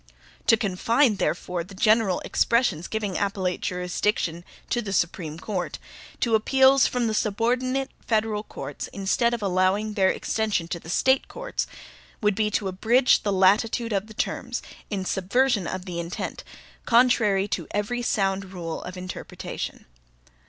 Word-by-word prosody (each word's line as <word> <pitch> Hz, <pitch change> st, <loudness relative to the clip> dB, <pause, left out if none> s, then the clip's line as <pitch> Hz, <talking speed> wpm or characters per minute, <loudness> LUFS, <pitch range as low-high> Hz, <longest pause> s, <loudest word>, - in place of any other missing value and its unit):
To 225 Hz, -, +6 dB
confine, 225 Hz, +3 st, +2 dB
therefore, 180 Hz, -2 st, -1 dB
the 195 Hz, +3 st, -13 dB
general 215 Hz, -2 st, +3 dB
expressions 200 Hz, -9 st, +1 dB
giving 210 Hz, -5 st, -2 dB
appellate 195 Hz, -3 st, -1 dB
jurisdiction 180 Hz, -1 st, -1 dB, 0.3 s
to 240 Hz, -, +1 dB
the 200 Hz, -4 st, -4 dB
Supreme 170 Hz, -3 st, -1 dB
Court, 185 Hz, 0 st, -3 dB, 0.4 s
to 235 Hz, -, +1 dB
appeals 265 Hz, +4 st, +5 dB
from 245 Hz, -1 st, -1 dB
the 220 Hz, -, 0 dB
subordinate 250 Hz, +6 st, 0 dB, 0.2 s
federal 215 Hz, -2 st, +1 dB
courts, -, -, -7 dB
instead 200 Hz, +4 st, +1 dB
of 225 Hz, -, -6 dB
allowing 195 Hz, +3 st, +1 dB
their 190 Hz, -3 st, +3 dB
extension 215 Hz, -6 st, -1 dB
to 175 Hz, -, -3 dB
the 160 Hz, -, -12 dB
State 265 Hz, +9 st, +2 dB
courts, -, -, -4 dB, 0.5 s
would 210 Hz, -1 st, +2 dB
be 210 Hz, +1 st, +1 dB
to 205 Hz, -1 st, -1 dB
abridge 230 Hz, +7 st, +3 dB
the 205 Hz, -, -1 dB
latitude 215 Hz, +4 st, +3 dB
of 200 Hz, +1 st, -1 dB
the 220 Hz, -, -12 dB
terms, -, -, -3 dB, 0.3 s
in 195 Hz, -3 st, -3 dB
subversion 200 Hz, +2 st, +1 dB
of 185 Hz, 0 st, -4 dB
the 175 Hz, -2 st, -4 dB
intent, 170 Hz, +1 st, -5 dB, 0.4 s
contrary 230 Hz, -5 st, +4 dB
to 175 Hz, -4 st, -2 dB
every 210 Hz, +4 st, -2 dB
sound 195 Hz, -4 st, 0 dB
rule 165 Hz, -3 st, -5 dB
of 180 Hz, +1 st, -8 dB
interpretation. 185 Hz, 0 st, -6 dB
205 Hz, 145 wpm, -25 LUFS, 185-230 Hz, 0.5 s, To